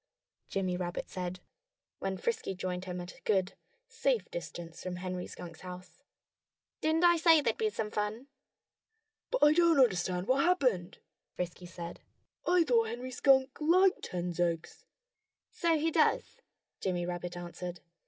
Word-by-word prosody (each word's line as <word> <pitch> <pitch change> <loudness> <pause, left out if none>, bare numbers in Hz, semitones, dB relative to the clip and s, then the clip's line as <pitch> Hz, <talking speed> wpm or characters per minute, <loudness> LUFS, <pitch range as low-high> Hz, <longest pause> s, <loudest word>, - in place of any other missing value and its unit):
Jimmy 185 -2 -1
Rabbit 175 -1 -4
said, 180 0 -4 0.6
when 190 0 -2
Frisky 455 - -2
joined 180 0 -3
him 180 -1 -4
at 175 +1 -9
a - - -20
good, 195 -3 +1 0.3
safe 475 0 0
distance 170 - -7
from 185 -1 -4
Henry 180 0 -4
Skunk's 170 -3 -9
house. 180 0 -10 0.8
"Didn't 315 +2 +2
I 345 -1 +6
say 325 -1 +6
there'd 235 -6 0
be 440 - +2
some 220 - -3
fun?" 210 +4 -2 1.0
"But - - +1
I 295 - +7
don't 335 -1 +5
understand 185 -6 +2
what 265 +2 +3
happened," 250 - +1 0.4
Frisky 180 0 -5
said. 170 -1 -7 0.5
"I 355 -1 +5
thought 235 -6 +3
Henry 245 +3 -5
Skunk 265 0 +4
liked 365 +5 +4
hens' 175 -1 -4
eggs." 170 -2 -1 0.7
"So 335 -2 +2
he 320 +2 +1
does!" - - +1 0.4
Jimmy 175 -2 -1
Rabbit 175 0 -4
answered. 175 0 -6
195 Hz, 145 wpm, -31 LUFS, -, 1.0 s, I